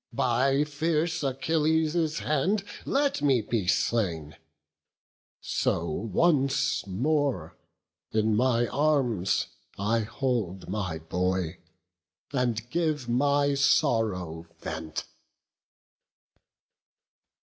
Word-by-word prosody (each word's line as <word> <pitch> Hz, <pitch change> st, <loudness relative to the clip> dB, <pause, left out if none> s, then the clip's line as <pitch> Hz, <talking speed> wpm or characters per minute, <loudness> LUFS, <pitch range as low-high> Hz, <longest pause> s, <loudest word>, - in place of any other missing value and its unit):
by 135 Hz, +2 st, +2 dB
fierce 160 Hz, +2 st, -1 dB
Achilles' 155 Hz, +3 st, +1 dB
hand 195 Hz, +7 st, +1 dB, 0.2 s
Let 280 Hz, -, +1 dB
me 135 Hz, -4 st, +4 dB
be 105 Hz, -3 st, -2 dB
slain, 85 Hz, -7 st, 0 dB, 1.0 s
so 85 Hz, -, -1 dB
once 135 Hz, -, +1 dB
more 120 Hz, -, 0 dB, 0.6 s
in 110 Hz, 0 st, +2 dB
my 120 Hz, +1 st, +3 dB
arms 135 Hz, -11 st, +1 dB, 0.3 s
I 110 Hz, +4 st, +1 dB
hold 110 Hz, -5 st, -2 dB
my 90 Hz, -4 st, -2 dB
boy, 90 Hz, +1 st, -2 dB, 0.7 s
and 120 Hz, -4 st, 0 dB
give 155 Hz, -6 st, 0 dB
my 140 Hz, +3 st, +2 dB
sorrow 110 Hz, -, +1 dB
vent." 80 Hz, 0 st, -5 dB
125 Hz, 80 wpm, -27 LUFS, 95-150 Hz, 1.0 s, me